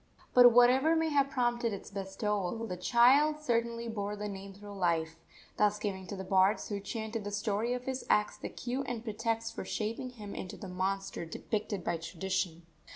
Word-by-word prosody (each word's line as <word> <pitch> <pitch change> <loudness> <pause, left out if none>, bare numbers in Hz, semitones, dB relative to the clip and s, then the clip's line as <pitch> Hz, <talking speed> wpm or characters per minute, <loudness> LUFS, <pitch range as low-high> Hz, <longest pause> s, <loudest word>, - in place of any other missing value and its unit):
But, 245 -1 +9
whatever 255 +7 +5
may 320 0 +2
have 280 -2 +3
prompted 240 -3 0
its 200 - -7
bestowal, 200 +2 -2
the 185 -5 -4
child 260 +10 +4
certainly 235 -4 -1
bore 205 -2 -3
the 210 0 -4
name 195 -1 -7
through 205 0 -10
life, 165 -3 0 0.4
thus 210 0 +3
giving 195 -3 -4
to 200 - -5
the 190 - -5
bards 190 +2 +3
who 205 -1 -2
chanted 220 +2 -4
the 205 - -4
story 210 +3 -1
of 250 0 -3
his 260 0 -3
acts 210 0 +3
the - - -6
cue 250 +2 -3
and 235 -2 -3
pretext 225 0 -2
for - - -5
shaping 225 +4 -3
him 210 -5 -9
into 185 - -6
the 195 - -8
monster 190 +1 -2
depicted 205 +3 -3
by 170 - 0
tradition. 175 0 -3
210 Hz, 185 wpm, -32 LUFS, 195-240 Hz, 0.4 s, But